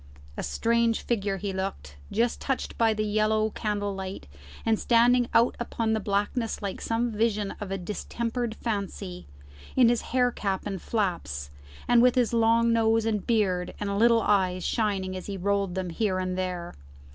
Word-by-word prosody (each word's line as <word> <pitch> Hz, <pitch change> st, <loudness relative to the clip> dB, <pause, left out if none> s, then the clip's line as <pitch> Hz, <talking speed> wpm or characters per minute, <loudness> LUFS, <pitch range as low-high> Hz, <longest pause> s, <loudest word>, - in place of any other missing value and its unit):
A -, -, -4 dB
strange 230 Hz, -, +1 dB
figure 200 Hz, -4 st, -1 dB
he 195 Hz, 0 st, -3 dB
looked, 190 Hz, -, -4 dB, 0.2 s
just 230 Hz, +2 st, 0 dB
touched 270 Hz, -2 st, -2 dB
by 225 Hz, -1 st, +3 dB
the 215 Hz, 0 st, -1 dB
yellow 215 Hz, +1 st, +1 dB
candle 205 Hz, -2 st, -2 dB
light, 190 Hz, 0 st, -6 dB, 0.4 s
and 220 Hz, -1 st, +2 dB
standing 240 Hz, +1 st, +4 dB
out 235 Hz, +1 st, +4 dB
upon 230 Hz, -2 st, -1 dB
the 220 Hz, -, +1 dB
blackness 210 Hz, +3 st, -1 dB
like 200 Hz, -3 st, -5 dB
some 230 Hz, +1 st, 0 dB
vision 210 Hz, -2 st, 0 dB
of 205 Hz, -, -4 dB
a 195 Hz, -, -2 dB
distempered 230 Hz, +5 st, -3 dB
fancy, 195 Hz, -, -4 dB, 0.5 s
in 250 Hz, -3 st, +6 dB
his 240 Hz, -1 st, +2 dB
hair 250 Hz, 0 st, +1 dB
cap 195 Hz, -4 st, -2 dB
and 195 Hz, -4 st, -4 dB
flaps, 120 Hz, -, -2 dB, 0.4 s
and 240 Hz, -1 st, +5 dB
with 250 Hz, 0 st, +5 dB
his 245 Hz, -2 st, +2 dB
long 230 Hz, 0 st, +4 dB
nose 225 Hz, 0 st, +3 dB
and 215 Hz, -3 st, -1 dB
beard 190 Hz, -6 st, +1 dB
and 200 Hz, -1 st, -1 dB
little 230 Hz, 0 st, +5 dB
eyes 185 Hz, -3 st, +2 dB
shining 195 Hz, -4 st, -1 dB
as 185 Hz, -, -7 dB
he 200 Hz, -1 st, -4 dB
rolled 200 Hz, -1 st, 0 dB
them 185 Hz, -2 st, -3 dB
here 190 Hz, +1 st, 0 dB
and 185 Hz, 0 st, -2 dB
there. 180 Hz, -2 st, -3 dB
210 Hz, 170 wpm, -27 LUFS, 190-230 Hz, 0.5 s, in